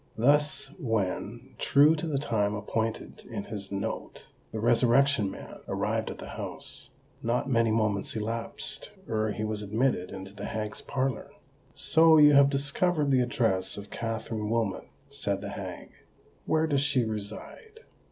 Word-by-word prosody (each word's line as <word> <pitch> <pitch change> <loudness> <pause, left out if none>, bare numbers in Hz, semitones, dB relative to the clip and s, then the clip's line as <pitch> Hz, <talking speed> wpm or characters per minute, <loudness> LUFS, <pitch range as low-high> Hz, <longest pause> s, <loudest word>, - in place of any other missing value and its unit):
Thus, 145 +6 +3
when, 110 - -2
true 145 +3 +5
to 165 +1 -4
the 150 -3 0
time 105 -7 0
appointed 110 +2 -3
in - - -4
his 100 -2 -6
note, 100 0 -5 0.2
the 110 - -4
Resurrection 120 0 +4
Man - - -9
arrived - - -1
at - - -6
the - - -9
house, - - -4 0.3
not 120 +3 0
many 115 -2 +3
moments 110 -2 0
elapsed 115 +2 -2 0.2
ere 110 -1 0
he 110 - -4
was 110 -1 -2
admitted 105 -2 0
into 95 0 -8
the 100 0 -7
hag's 105 -1 -4
parlour. 135 -2 -2 0.5
"So 160 0 +5
you 150 -1 +8
have 140 0 +7
discovered 145 +2 +1
the 130 -1 +4
address 115 -8 0
of 100 0 -9
Katherine 110 -1 -3
Wilmot," 110 -4 -1 0.2
said - - -1
the - - -5
hag. - - -7 0.6
"Where 160 0 +3
does 145 -3 +1
she 135 -4 +2
reside?" 110 - -7
115 Hz, 150 wpm, -28 LUFS, 105-140 Hz, 0.6 s, you